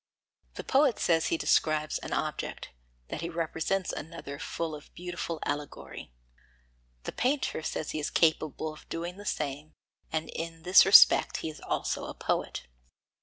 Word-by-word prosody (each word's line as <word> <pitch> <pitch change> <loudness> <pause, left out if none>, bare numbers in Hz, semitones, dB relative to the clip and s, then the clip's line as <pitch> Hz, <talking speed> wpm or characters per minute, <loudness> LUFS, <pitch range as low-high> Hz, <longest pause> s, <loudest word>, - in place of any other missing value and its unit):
The - - -5
poet 270 -3 +3
says 165 -1 +2
he 165 - +1
describes 155 -1 +1
an - - -8
object, - - -3 0.4
that - - -4
he 170 - -3
represents 165 +2 -1
another 150 -3 -7
full 165 -1 -3
of 150 -1 -10
beautiful 175 -2 -5
allegory; 145 - -5 0.9
the - - -4
painter 265 - 0
says 155 - -3
he 155 - -3
is 150 - -2
capable 155 -1 +1
of 155 - -16
doing 175 +2 -4
the 205 - -10
same, 145 +1 -3 0.4
and 160 0 -1
in 165 0 -6
this 180 +2 +7
respect 195 - +8
he 160 - -2
is 155 - -14
also - - -2
a - - -7
poet. - - -2
165 Hz, 155 wpm, -29 LUFS, 155-175 Hz, 0.9 s, respect